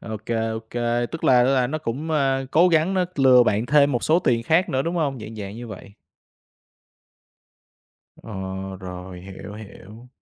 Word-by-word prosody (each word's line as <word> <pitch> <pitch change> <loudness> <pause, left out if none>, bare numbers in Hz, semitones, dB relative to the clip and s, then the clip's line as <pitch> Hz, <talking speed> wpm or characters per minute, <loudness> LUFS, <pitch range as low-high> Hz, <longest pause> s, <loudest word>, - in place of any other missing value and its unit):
Ô 110 -1 -6
kê, 115 - -1
ô 110 0 -3
kê. 120 0 -1
Tức 165 - -7
là 125 -1 +5
là 130 -1 +2
nó 155 +4 -3
cũng, 150 +4 -4
a, 135 -3 +1
cố 175 +5 +5
gắng 165 +3 +2
nó 185 -1 +2
lừa 130 -2 +6
bạn 110 +1 0
thêm 145 +1 +4
một 120 - -1
số 160 +3 +4
tiền 120 -8 +1
khác 175 - +2
nữa, 135 -3 0
đúng 170 +3 -3
hông? 140 -5 -1
Dạng 110 +1 -9
dạng 100 +1 -7
như 120 0 -8
vậy. 100 -1 -10 2.3
Ờ, 115 - -11 0.5
rồi, 90 -1 -9
hiểu, 95 +2 -10
hiểu. 110 +2 -12
125 Hz, 180 wpm, -23 LUFS, 110-150 Hz, 2.3 s, lừa